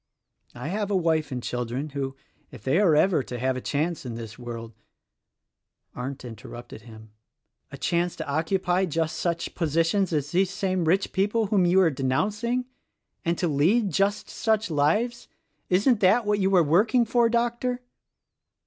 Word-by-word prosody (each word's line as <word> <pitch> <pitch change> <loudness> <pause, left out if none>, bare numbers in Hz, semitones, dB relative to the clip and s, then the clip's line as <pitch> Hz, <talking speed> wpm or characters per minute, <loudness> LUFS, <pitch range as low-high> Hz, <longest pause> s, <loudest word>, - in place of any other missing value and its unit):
I 125 +5 -5
have 205 +2 -2
a 200 - +1
wife 160 -4 +1
and 125 -2 -4
children 125 +4 -3
who, 135 -1 -4 0.3
if 120 -5 -13
they 135 +8 +2
are 180 -7 +4
ever 175 0 +3
to 125 -1 -6
have 130 +2 0
a 130 - -4
chance 155 +5 -2
in 120 -3 -6
this 115 -1 -7
world 115 -2 -7 0.4
— - - -59
" - - -47
Arndt 130 +1 -6
interrupted 120 0 -10
him. 110 -1 -14 0.6
"A - - -8
chance 175 0 0
to - - -6
occupy 180 +5 +1
just 165 -1 -1
such 170 -1 -2
positions 165 +4 +1
as 150 -2 -1
these 185 +1 +2
same 185 -3 -1
rich 185 +5 +1
people 205 +4 +1
whom 195 -3 +2
you 180 +2 +4
are 170 -3 +4
denouncing, 210 - -1 0.6
and 170 0 0
to 175 - 0
lead 180 +9 +2
just 200 +6 0
such 220 -3 0
lives 210 +12 +1 0.2
— - - -47
isn't 205 +6 +3
that 210 +5 +4
what 205 0 +1
you 190 0 +2
are 175 - +6
working 215 - +3
for, 235 +1 +3
Doctor?" 240 +1 -1
170 Hz, 175 wpm, -26 LUFS, 140-205 Hz, 0.6 s, are